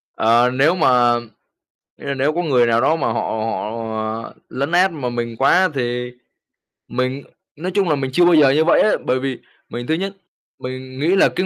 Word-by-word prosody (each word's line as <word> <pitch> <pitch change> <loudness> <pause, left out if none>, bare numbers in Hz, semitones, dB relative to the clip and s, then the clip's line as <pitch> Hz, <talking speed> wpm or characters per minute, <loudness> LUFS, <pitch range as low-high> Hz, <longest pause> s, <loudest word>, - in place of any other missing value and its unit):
Ờ, 120 +2 +3
nếu 150 +7 +3
mà 170 - +2 1.1
ơ, 140 - -3
nếu 140 +3 +1
có 175 - -1
người 125 -6 +3
nào 115 0 +2
đó 160 - +2
mà 150 - -1
họ 115 - -1
họ, 110 +1 -4
ờ, - - -10 0.2
lấn 140 +5 -3
át 180 +1 +3
mà 135 -6 -4
mình 120 -1 -4
quá 185 +7 +3
thì 125 -1 -3 0.8
mình 130 +2 -3 0.3
nói 180 +4 -4
chung 195 -4 +2
là, 150 - +3
mình 135 -1 -3
chưa 175 - +4
bao 175 - +5
giờ 150 -4 +6
như 155 +4 +3
vậy 170 - +4
á. 215 - +3
Bởi 130 - +1
vì 135 -2 -3 0.3
mình 120 0 -6
thứ 160 - +1
nhất 195 +4 -2 0.5
mình 130 +1 -8
nghĩ 170 +6 +2
là 195 - +4
cái 185 - -2
135 Hz, 205 wpm, -19 LUFS, 120-160 Hz, 1.1 s, giờ